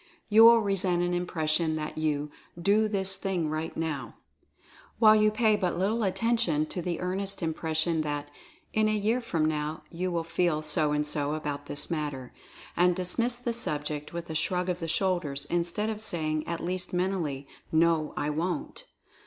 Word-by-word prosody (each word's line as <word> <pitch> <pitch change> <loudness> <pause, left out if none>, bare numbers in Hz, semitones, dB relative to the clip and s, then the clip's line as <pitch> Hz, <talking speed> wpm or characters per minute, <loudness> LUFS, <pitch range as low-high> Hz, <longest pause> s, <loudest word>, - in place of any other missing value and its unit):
You 220 +2 +8
will 230 0 +8
resent 185 -3 +2
an 175 0 0
impression 160 -2 0
that 155 -1 -4
you 150 -1 -1 0.3
"Do 205 +5 +3
this 195 -2 -1
thing 185 -6 -2
right 155 +1 -4
Now," 145 -8 -3 0.8
while 215 -1 +7
you 215 0 +5
pay 215 0 +3
but 185 -4 -1
little 210 +6 +1
attention 195 -6 +1
to 180 - -3
the 170 -1 -3
earnest 190 +1 -2
impression 160 0 0
that 145 -1 -3 0.4
"in 215 0 +3
a 215 - +1
year 220 +5 +1
from 165 -9 0
now 155 0 -2
you 180 +2 -2
will 170 -2 -1
feel 165 -2 0
so 150 0 +1
and 150 0 +1
so 150 0 -1
about 145 -2 -4
this 145 - -2
matter," 145 -5 -3 0.4
and 180 0 +4
dismiss 230 +7 +1
the 240 -1 -3
sub 150 -11 -2
ject 150 0 -4
with 170 0 -5
a - - -3
shrug 180 +3 0
of 180 -1 -1
the 165 - -4
shoulders, 165 -6 0
instead 175 +5 0
of 215 -1 -5
saying, 155 -7 -1
at 170 -1 -3
least 180 +1 -3
mentally, 175 -7 -1 0.2
"No, 160 -1 +2
I 145 +1 0
Wont!" 285 - -3
170 Hz, 175 wpm, -28 LUFS, 155-195 Hz, 0.8 s, You